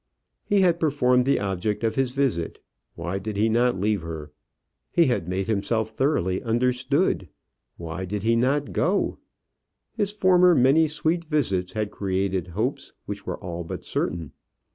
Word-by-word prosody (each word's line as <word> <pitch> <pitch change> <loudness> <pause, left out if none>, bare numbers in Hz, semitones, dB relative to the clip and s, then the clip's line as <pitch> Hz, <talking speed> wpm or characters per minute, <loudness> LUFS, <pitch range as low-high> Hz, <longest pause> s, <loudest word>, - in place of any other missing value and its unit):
He 205 -1 +2
had 175 -2 +3
performed 125 -5 +3
the 140 - +3
object 100 +2 -2
of 115 - +1
his 135 -2 +1
visit; 125 -13 -1 0.4
why 95 +3 -3
did 105 +1 -5
he 110 +2 +3
not 120 -2 +2
leave 105 0 +1
her? 80 -3 -7 0.6
He 170 - +4
had 120 - 0
made 95 +1 -1
himself 110 +1 0
thoroughly 110 - 0
understood; 125 - +1 0.5
why 85 +2 -5
did 100 +2 -4
he 115 +1 +3
not 135 +4 +1
go? 190 +4 0 0.7
His 205 -3 -1
former 180 -3 +5
many 140 +5 +5
sweet 155 +3 0
visits 100 - 0
had 105 -1 -2
created 95 -2 -1
hopes 110 +10 -3
which - - -7
were - - -3
all 85 -1 -6
but 80 - -7
certain. 80 -3 -2
115 Hz, 155 wpm, -25 LUFS, 95-145 Hz, 0.7 s, former